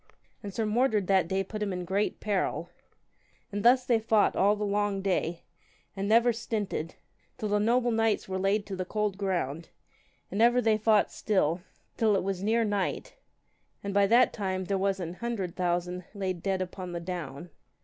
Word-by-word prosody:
And 205 - -6
Sir 220 +3 -1
Mordred 215 -2 +2
that 190 -3 +3
day 190 +2 0
put 210 +3 -7
him 205 -1 -1
in 180 -1 -4
great 195 +4 -1
peril. 185 -4 -1 0.8
And 205 0 -3
thus 250 +1 +5
they 235 -3 +3
fought 220 -1 +2
all 205 +2 +4
the 210 0 -2
long 205 -1 0
day, 175 -3 -1 0.5
and 195 +1 -2
never 235 +2 +5
stinted, 210 -7 -3 0.4
till 215 - -3
the 205 0 +2
noble 240 +3 +2
knights 225 -1 +1
were 190 0 -3
laid 200 +2 +1
to 195 - -5
the 185 - -2
cold 210 +1 -1
ground, 175 -6 -2 0.6
and 200 +4 -1
ever 240 +1 +5
they 220 -3 +2
fought 215 -1 +3
still, 180 -5 0 0.4
till 220 -3 +3
it 190 - 0
was 195 -1 -2
near 225 +3 +2
night, 205 -3 -2 0.7
and 200 0 -3
by 200 0 +4
that 240 +4 +5
time 190 -3 -2
was 195 0 +1
there 180 - -4
an 165 - -6
hundred 200 -4 -4
thousand 180 0 -1
laid 185 -3 -3
dead 190 0 0
upon 180 -1 -7
the 170 - -3
down. 170 -2 -6
200 Hz, 185 wpm, -28 LUFS, 185-215 Hz, 0.8 s, thus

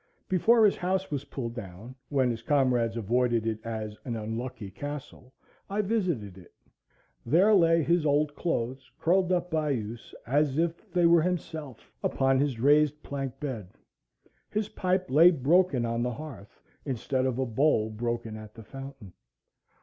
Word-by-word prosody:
Before 220 +5 +4
his 205 - +3
house 190 0 -1
was 145 -1 -3
pulled 120 -5 -5
down, 110 +1 -9 0.2
when 130 -4 +2
his 115 -1 -5
comrades 125 -4 +1
avoided 120 +1 +1
it 110 -1 -1
as 110 -2 -5
"an 120 -3 -4
unlucky 110 -1 -5
castle," 135 +1 -8 0.4
I 205 +2 0
visited 170 - -2
it. 90 - -18 0.7
There 180 - +4
lay 165 -4 +5
his 170 +2 +2
old 145 0 +2
clothes 130 -6 -3
curled 185 +2 +2
up 180 0 0
by 155 -2 0
use, 115 -3 -4
as 145 +2 +1
if 170 +1 -2
they 175 -1 +3
were 170 -1 +6
himself, 160 -7 -4 0.2
upon 135 0 +2
his 135 -4 0
raised 150 +3 +3
plank 135 -2 -5
bed. 115 -10 -6 0.7
His 215 0 -2
pipe 185 0 0
lay 155 +6 +7
broken 155 -3 +2
on 115 0 -1
the 125 0 -1
hearth, 130 -7 -10 0.2
instead 130 0 -1
of 125 -2 -2
a 130 - 0
bowl 115 -2 +2
broken 115 0 -3
at 110 -1 -11
the 115 - -10
fountain. 135 -6 -10
135 Hz, 155 wpm, -28 LUFS, 115-165 Hz, 0.7 s, lay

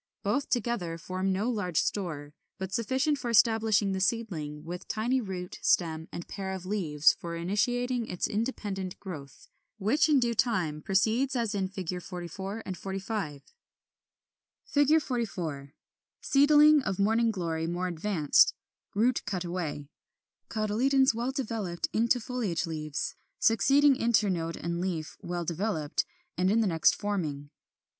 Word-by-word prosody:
Both 250 +8 0
together 210 -9 -1
form 185 +3 -2
no 195 +4 0
large 180 -8 0
store, 150 -7 -2 0.2
but 190 -1 -5
sufficient 265 +6 +1
for 245 - -3
establishing 220 -3 +4
the 190 - -1
seedling, 170 -9 -1
with 175 +2 -6
tiny 245 +4 0
root, 185 -4 -6
stem, 160 -2 +1
and 170 - -7
pair 190 -1 -4
of 185 -1 -6
leaves 165 -7 +3
for 170 -1 -6
initiating 240 +7 0
its 180 - -2
independent 205 -4 -3
growth; 145 -9 -9 0.3
which 235 +11 +2
in 290 -3 +5
due 240 -1 +1
time 185 -11 0
proceeds 225 - +1
as 230 -3 0
in 195 -2 0
Fig. 185 -2 -4
44, 190 +4 -6
45. 190 -6 -4
[Illustration: - - -24 1.4
Fig. 315 +2 +6
44. 170 - -3 0.5
Seedling 295 +1 +6
of 195 -7 -2
Morning 225 +3 +3
Glory 165 -5 -2
more 175 +2 -1
advanced 170 -3 +3 0.4
(root 235 +4 +2
cut 185 -3 -2
away); 170 -5 -4 0.6
cotyledons 240 +5 +2
well 240 +3 -2
developed 215 -10 -2
into 235 +3 +3
foliage 230 -8 -2
leaves: 155 -3 -3 0.2
succeeding 275 +6 +5
internode 200 -9 +1
and 170 +1 -3
leaf 170 -4 -3
well 175 0 -3
developed, 170 -3 -1 0.3
and 185 +1 +3
the 205 - +3
next 165 -5 +3
forming. 155 -9 -3
195 Hz, 135 wpm, -29 LUFS, 170-230 Hz, 1.4 s, Fig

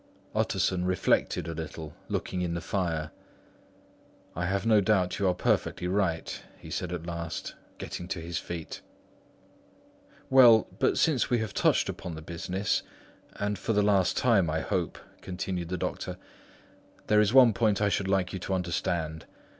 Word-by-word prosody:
Utterson 90 -1 +1
reflected 90 -3 +1
a 85 - -3
little, 80 -1 -7 0.2
looking 90 - -2
in 85 -1 -1
the - - -1
fire. 80 -5 -2 1.2
"I 90 +1 -1
have 100 +3 -1
no 110 -2 +5
doubt 95 -3 +1
you 100 - +2
are 90 - +2
perfectly 90 - 0
right," 90 -4 -1 0.2
he - - -11
said 90 - -3
at 85 -2 -4
last, 85 -1 -5 0.2
getting 90 - -6
to 90 - -3
his 85 +1 -4
feet. 85 -2 -6 1.5
"Well, 120 -4 +7
but - - +2
since 150 -7 +2
we 120 - +3
have 110 -2 -3
touched - - +3
upon 90 -3 -5
this 80 0 -9
business, 90 +4 -1 0.5
and 105 0 -2
for 115 - -1
the 105 0 +3
last 100 -3 +3
time 105 -9 +3
I 80 +1 0
hope," - - -2 0.2
continued 90 -2 -4
the 90 - -2
doctor, - - -4 0.9
"there 105 0 +4
is 105 0 +2
one 125 -3 +7
point 105 -1 +2
I 105 -1 +2
should 100 -1 0
like 95 -1 +1
you 95 - -3
to 95 +1 -2
understand. 85 -2 -2
90 Hz, 160 wpm, -28 LUFS, 85-105 Hz, 1.5 s, Well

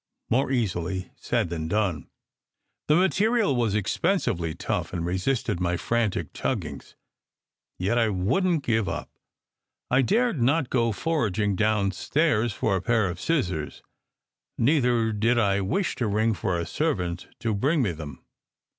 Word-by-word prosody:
More 130 +4 +2
easily 95 -7 -2
said - - -1
than 80 -2 -3
done! 90 -7 -1 0.8
The 150 - +4
material 200 - +2
was 115 -4 +1
expensively 85 -5 0
tough, - - -3
and 85 -2 -2
resisted 95 +2 -1
my 90 -1 0
frantic 115 0 -1
tuggings, 80 - -4 0.8
yet 100 +7 +1
I 115 -2 +3
wouldn 155 - +1
t 120 - -1
give 110 -4 +1
up. - - -5 0.8
I 125 +2 +5
dared 220 - +1
not 135 +2 +2
go 115 -2 +2
foraging 105 - 0
downstairs 110 - +1
for 100 0 0
a 95 - -1
pair 110 -1 +2
of 85 - -8
scissors; 90 - -1 0.7
neither 120 -4 +2
did 115 +3 +1
I 100 -3 +2
wish 175 - -1
to 120 - 0
ring 110 +2 +2
for 95 -3 -1
a 85 - -2
servant 90 - -2
to 115 -2 0
bring 135 +8 +1
me 100 - +1
them. 80 -3 -9
110 Hz, 145 wpm, -26 LUFS, 95-130 Hz, 0.8 s, I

